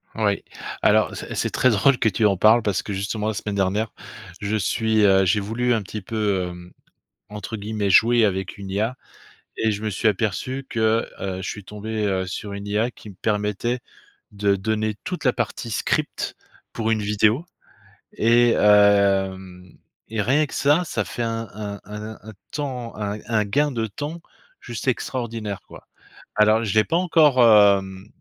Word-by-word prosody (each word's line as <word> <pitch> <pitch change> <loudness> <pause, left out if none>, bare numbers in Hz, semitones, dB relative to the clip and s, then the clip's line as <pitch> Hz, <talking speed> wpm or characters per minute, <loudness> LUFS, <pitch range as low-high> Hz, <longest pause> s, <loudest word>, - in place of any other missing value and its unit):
Oui, 105 -2 0 0.4
alors - - +3
c'est - - -7
c'est - - 0
très 130 - +2
drôle 125 +4 +3
que 115 - +2
tu 110 +2 0
en 100 -2 +4
parles, 110 +5 +5
parce 105 -4 -1
que, - - -6
justement, 100 +2 -2
la - - -2
semaine 105 +1 -4
dernière, 100 +3 0 0.5
je 105 +1 0
suis, 110 +1 +1
heu 95 -1 +5
j'ai 100 +4 +2
voulu, 115 +5 0
un 115 - 0
petit 105 +2 -7
peu, 100 -3 -1
hem, 90 0 -11 0.6
entre 105 +1 -6
guillemets: 105 -1 -2
«jouer», 115 +3 +5
avec 95 0 -2
une 100 -1 -8
IA 110 +6 -1 0.6
et 110 - +1
je 105 0 -4
me 110 - -2
suis 105 +3 0
aperçu 115 +6 -2
que, 110 0 +1
heu, 95 -1 -3
je - - -4
suis 105 - -7
tombé, 105 +2 -4
heu, 95 -2 -1
sur 100 +3 -5
une 100 0 -6
IA 110 +4 0
qui 110 - -13
me 100 - -12
permettait 105 +4 -1 0.5
de 100 -1 +1
donner 110 +2 -1
toute 180 0 -5
la 125 - +4
partie 115 0 -3
script 100 - -1 0.4
pour 115 -1 -1
une 110 -1 +1
vidéo, 105 +8 +2 0.7
et 120 +1 +4
hem, 95 -3 +3 0.3
et 110 -1 -1
rien 140 +8 +3
que - - -11
ça, 145 +5 +3
ça - - -2
fait 120 - -5
un 115 -1 -3
un 100 -1 -6
un 105 +2 -7
un 110 +1 -10 0.2
temps, 130 -5 -4
un 105 0 -3
un 110 -2 +1
gain 145 +8 +1
de 115 -3 -2
temps 145 +10 -6 0.4
juste 120 +2 -7
extraordinaire, 115 -5 -2
quoi. - - -14 0.5
Alors, 110 +1 +4
je 100 - -2
l'ai 110 0 +5
pas 165 - 0
encore, 160 -6 +4
hem, 100 -3 +4
105 Hz, 180 wpm, -23 LUFS, 100-115 Hz, 0.7 s, parles